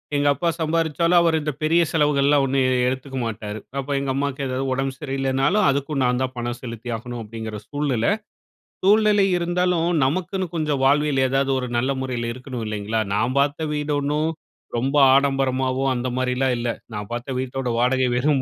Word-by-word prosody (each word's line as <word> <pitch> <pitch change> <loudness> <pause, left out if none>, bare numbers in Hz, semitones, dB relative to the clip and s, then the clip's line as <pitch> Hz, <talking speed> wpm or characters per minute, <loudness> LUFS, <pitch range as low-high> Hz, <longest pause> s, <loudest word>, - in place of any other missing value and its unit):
எங்க 145 0 +2
அப்பா 170 +5 -1
சம்பாரிச்சாலும், 165 +2 +2
அவரு 165 -1 +3
இந்த 150 - -2
பெரிய 165 +3 +4
செலவுகள்லாம் 145 -2 +3
ஒண்ணும் 135 0 +1
எ - - +2 0.2
எடுத்துக்க 130 +1 -5
மாட்டாரு. 110 -1 -4 0.2
அப்ப 135 - -5
எங்க 135 -1 -2
அம்மாக்கு 140 0 -2
ஏதாவது 130 +1 -2
உடம்பு 135 0 -1
சரியில்லைனாலும், 135 +7 +1
அதுக்கும் 140 +1 -1
நான் 125 0 +1
தான் 130 -1 -2
பணம் 120 0 -3
செலுத்தி 115 -1 -7
ஆகணும். 120 +1 -6
அப்டிங்கிற 110 0 -6
சூழ்நிலை. 145 - 0 0.7
சூழ்நிலை 210 0 +4
இருந்தாலும் 175 -1 +1 0.2
நமக்குன்னு 185 +5 -1
கொஞ்சம் 150 -4 0
வாழ்வில் 145 -1 +3
ஏதாவது 135 0 +1
ஒரு 125 - -3
நல்ல 130 +3 +1
முறையில 120 -3 -2
இருக்கணும் 125 -1 -6
இல்லைங்களா? 105 +1 -2
நான் 120 +6 0
பார்த்த 145 +3 0
வீடு 150 0 -1
ஒண்ணும் 150 +3 0 0.5
ரொம்ப 135 +4 -1 0.2
ஆடம்பரமாவோ, 135 -1 +1
அந்த 120 +1 -2
மாரிலாம் 130 0 +1
இல்ல. 120 0 -2 0.2
நான் 105 -1 -5
பார்த்த 120 +2 -4
வீட்டோட 130 0 -3
வாடகை 130 +1 +2
வெறும் 135 +2 +2
135 Hz, 165 wpm, -22 LUFS, 125-150 Hz, 0.7 s, பெரிய